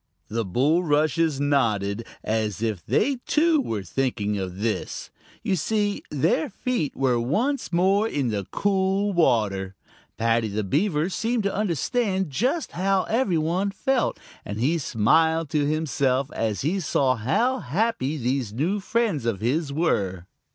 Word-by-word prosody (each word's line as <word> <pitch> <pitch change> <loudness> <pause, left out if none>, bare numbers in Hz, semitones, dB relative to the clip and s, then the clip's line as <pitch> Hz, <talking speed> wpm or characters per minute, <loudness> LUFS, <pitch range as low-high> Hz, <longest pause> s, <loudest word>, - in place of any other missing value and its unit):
The 115 +1 -1
bulrushes 150 - +2
nodded, 115 -7 0 0.2
as 110 -1 -1
if 110 -6 -2
they 275 -1 +1
too 315 -1 +3
were 110 - -3
thinking 105 +1 -1
of 95 -2 -4
this. 110 +2 -3 0.3
You 190 - +1
see 205 +4 0
their 150 - +1
feet 235 - -2
were 130 -3 +1
once 230 - -1
more 190 +5 +3
in 140 - -1
the 100 -3 -3
cool 195 0 +1
water. 100 - +1 0.4
Paddy 115 0 +2
the 105 +1 -2
Beaver 155 - +1
seemed 225 +3 -1
to 200 - 0
understand 190 - 0
just 250 - 0
how 190 +1 +1
every 220 -7 +1
one 175 +6 0
felt, 265 +4 0 0.2
and 105 +1 -5
he 155 +8 +1
smiled 160 +6 +2
to 150 -3 +1
himself 140 -3 0
as 110 -2 -2
he 170 +8 0
saw 135 -5 +1
how 230 - +1
happy 155 - -1
these 125 -3 -1
new 170 - 0
friends 200 - 0
of 110 -5 0
his 140 - 0
were. 100 - 0
150 Hz, 145 wpm, -24 LUFS, -, 0.4 s, too